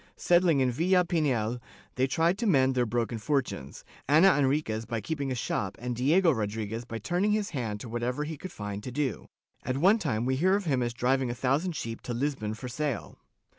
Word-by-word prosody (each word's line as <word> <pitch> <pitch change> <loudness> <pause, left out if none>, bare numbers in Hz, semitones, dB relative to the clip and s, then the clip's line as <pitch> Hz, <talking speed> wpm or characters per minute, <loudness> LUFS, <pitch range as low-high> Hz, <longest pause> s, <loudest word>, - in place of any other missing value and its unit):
Settling 175 -5 +3
in 130 -1 +2
Villa 180 +7 +3
Pinhel, 125 -9 0 0.3
they 130 +1 +1
tried 165 +6 +2
to 235 - 0
mend 135 -7 +4
their 125 -2 +1
broken 115 0 -1
fortunes. 125 - -2 0.2
Ana 165 +6 +6
Enriquez 135 -6 0
by 115 0 -3
keeping 140 +4 -3
a - - -1
shop 100 -4 -2
and 125 0 -3
Diego 160 +8 +4
Rodriguez 110 -1 -3
by 115 -1 -5
turning 175 - 0
his 210 -1 -1
hand 115 -8 -3
to - - -7
whatever 120 +5 -2
he 155 +1 -5
could 185 +6 -8
find 105 -1 -5
to 125 - -6
do 135 -2 -2 0.2
— - - -40
at 130 - -2
one 195 +9 +4
time 120 - -1
we 130 +1 +1
hear 185 +6 +3
of 200 -1 -2
him 135 -5 +1
as 120 0 -2
driving 130 +1 +1
a 120 - -3
thousand 145 +8 0
sheep 115 -4 -5
to 120 - -4
Lisbon 120 -5 -2
for 125 - -7
sale. 145 +2 -4
130 Hz, 210 wpm, -28 LUFS, 115-160 Hz, 0.3 s, Ana